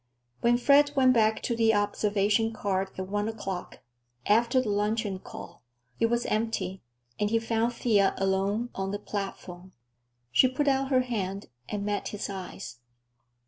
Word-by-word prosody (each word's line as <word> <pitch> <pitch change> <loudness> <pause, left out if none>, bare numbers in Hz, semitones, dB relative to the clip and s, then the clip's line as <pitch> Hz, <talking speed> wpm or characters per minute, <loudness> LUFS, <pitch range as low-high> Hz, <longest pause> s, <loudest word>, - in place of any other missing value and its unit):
When 240 0 +3
Fred 285 +3 +4
went 260 -2 +5
back 220 -2 +2
to 235 - -1
the 225 -1 +3
observation 205 +1 +1
car 195 -3 -1 0.2
at 190 0 -4
one 205 +2 -1
o'clock, 195 -5 -5 0.4
after 235 +4 +3
the 250 -4 -1
luncheon 205 -1 -1
call, 170 -2 -10 0.4
it 230 - +3
was 235 +1 0
empty, 210 -4 -2 0.4
and 210 0 +1
he 230 - +2
found 225 +1 0
Thea 205 -5 +2
alone 195 +5 0
on 195 0 -3
the 205 - -2
platform. 190 -3 -6 0.6
She 255 - +6
put 275 +3 -1
out 270 -1 +2
her 260 -2 +4
hand, 200 -5 -4 0.2
and 205 -1 -3
met 205 -1 -2
his 205 -1 -4
eyes. 190 -7 -7
210 Hz, 155 wpm, -28 LUFS, 195-235 Hz, 0.6 s, She